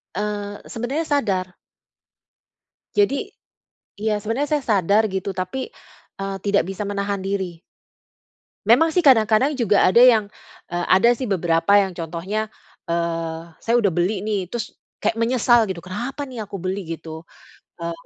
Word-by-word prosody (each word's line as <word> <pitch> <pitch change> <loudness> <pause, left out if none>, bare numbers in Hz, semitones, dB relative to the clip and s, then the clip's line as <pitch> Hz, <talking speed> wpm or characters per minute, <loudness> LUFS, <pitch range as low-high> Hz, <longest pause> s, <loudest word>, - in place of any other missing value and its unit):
Eee, 205 -1 -3
sebenernya 265 +8 -3
sadar. 195 -11 -1 1.4
Jadi, 405 -10 +2 0.7
iya 210 -1 0
sebenernya 230 +8 -1
saya 290 - -2 0.2
sadar 205 +5 +2
gitu, 190 +1 -3
tapi, 185 - -3 0.5
eee, 195 0 -3
tidak 200 0 +2
bisa 195 +2 -4
menahan 200 0 -2
diri. 190 -4 -3 1.0
Memang 250 +10 +5
sih 350 +2 +1
kadang-kadang 230 +2 +5
juga 215 -6 +3
ada 210 +6 +5
yang, 235 -4 +6 0.5
eee, 175 0 -1
ada 190 +6 +5
sih 250 +1 -4
beberapa 175 +1 +3
yang 195 -2 +2
contohnya, 175 +6 -3 0.4
eee, 165 -1 -2 0.2
saya 230 - +1
udah 205 -6 +2
beli 185 +3 0
nih, 200 -4 -2
terus 230 -3 -5 0.2
kayak 220 +2 -1
menyesal 240 -1 +3
gitu, 190 - -3
"Kenapa 240 +10 -5
nih 250 -5 -7
aku 200 - -6
beli 190 +2 -3 0.2
gitu, 160 0 -9 0.6
eee, 170 0 -4
205 Hz, 140 wpm, -22 LUFS, 185-235 Hz, 1.4 s, yang